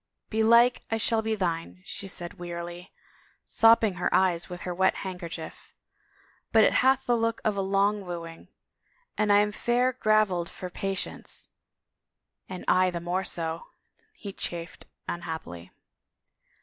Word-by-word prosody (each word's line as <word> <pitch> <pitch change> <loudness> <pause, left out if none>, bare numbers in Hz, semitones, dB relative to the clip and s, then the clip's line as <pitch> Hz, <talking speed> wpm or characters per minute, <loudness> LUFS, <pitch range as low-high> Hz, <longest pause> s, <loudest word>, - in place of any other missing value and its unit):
" - - -56
Belike 235 +3 +5
I 225 - 0
shall 225 0 +1
be 220 0 -1
thine," 180 -1 -3
she 195 - -6
said 175 -2 -5
wearily, 175 0 -7 0.5
sopping 225 -2 +5
her - - +1
eyes 180 -2 +2
with 180 0 -7
her 180 - -4
wet 190 +2 +2
handkerchief, 175 -3 -7 0.8
"but 220 -1 +6
it - - +4
hath 265 +1 +3
the 240 - +3
look 230 0 0
of 215 -2 +2
a 195 - 0
long 200 +1 +1
wooing. 165 -1 -7 0.7
And 210 -1 +2
I 205 - +7
am 210 0 0
fair 245 +4 +1
graveled 215 -7 +2
for 180 -1 -8
patience." 195 +2 -4 0.5
" - - -49
And 185 -1 -7
I 185 0 +4
the 175 -1 -4
more 175 +2 -1
so," 165 -2 -3 0.5
he 200 -2 -8
chafed 170 -2 -6 0.2
unhappily. 160 - -6
190 Hz, 150 wpm, -27 LUFS, 175-220 Hz, 0.8 s, I